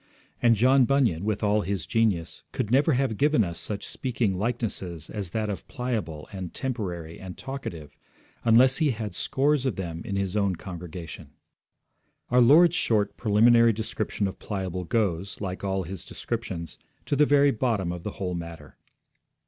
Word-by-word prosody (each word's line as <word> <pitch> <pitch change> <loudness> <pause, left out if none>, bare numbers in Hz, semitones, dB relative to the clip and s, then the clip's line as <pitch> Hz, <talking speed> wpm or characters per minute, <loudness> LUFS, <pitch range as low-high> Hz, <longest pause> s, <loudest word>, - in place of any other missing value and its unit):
And 120 -1 +5
John 130 +4 +5
Bunyan, 120 -11 +2
with 105 -1 -1
all 105 +1 +3
his 95 -5 -3
genius, 100 -5 0
could 115 -4 -2
never 145 +5 +4
have 125 -4 0
given 150 -5 +4
us 85 -3 -4
such 100 -1 -3
speaking 120 -6 -1
likenesses 100 -6 -3
as 100 -4 -4
that 110 +3 -2
of 100 -2 -5
Pliable 110 - -4
and 95 -3 -6
Temporary 90 -11 -4
and 95 -1 -8
Talkative, 90 - -7 0.5
unless 125 +3 +5
he 155 -3 +2
had 125 - -1
had 105 -4 -4
scores 135 +7 +1
of 120 - -1
them 85 -3 -5
in 100 - -4
his 100 0 -1
own 100 -3 +1
congregation. 85 -2 -8 1.0
Our 125 0 +5
Lord's 165 +8 +6
short 105 - +1
preliminary 115 +2 +5
description 105 -1 -2
of 95 - -7
Pliable 95 -3 -4
goes, 100 -4 -1
like 95 -2 -5
all 95 -1 -1
His 90 +2 -7
descriptions, 85 -2 -5 0.3
to - - 0
the 150 +1 +4
very 145 0 +5
bottom 110 -7 0
of 90 -1 -5
the 105 - -5
whole 90 -2 -3
matter. 85 -1 -8
105 Hz, 165 wpm, -26 LUFS, 90-125 Hz, 1.0 s, Lord's